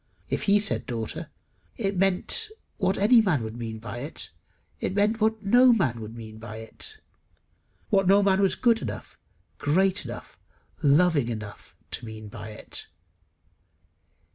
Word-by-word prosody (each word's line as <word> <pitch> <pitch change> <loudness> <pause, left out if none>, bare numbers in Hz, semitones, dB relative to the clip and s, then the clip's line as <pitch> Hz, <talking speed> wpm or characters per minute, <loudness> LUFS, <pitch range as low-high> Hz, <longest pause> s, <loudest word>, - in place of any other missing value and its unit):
If - - -1
he 200 - +7
said 205 0 +1
Daughter, 115 -4 -4 0.5
it 200 -3 -1
meant 195 - +2 0.3
what 190 -2 +1
any 225 +4 +6
man 165 - +1
would 110 0 -5
mean 115 -2 -5
by 115 +2 -7
it; 145 +5 -6 0.5
it 190 - -2
meant 210 +2 +2
what 220 0 +1
no 245 +5 +6
man 150 - +2
could 110 +1 -8
mean 110 -1 -9
by 110 -1 -8
it 115 - -8 0.9
what 195 -3 +4
no 200 +2 +6
man 195 0 +3
was 195 - +3
good 230 -2 +3
enough, - - -6 0.4
great 190 +6 +2
enough, - - -9 0.4
loving 150 -2 +4
enough 105 -3 -7 0.2
to 120 - -5
mean 110 -1 -8
by 105 0 -8
it. 110 - -7
180 Hz, 150 wpm, -26 LUFS, -, 0.9 s, he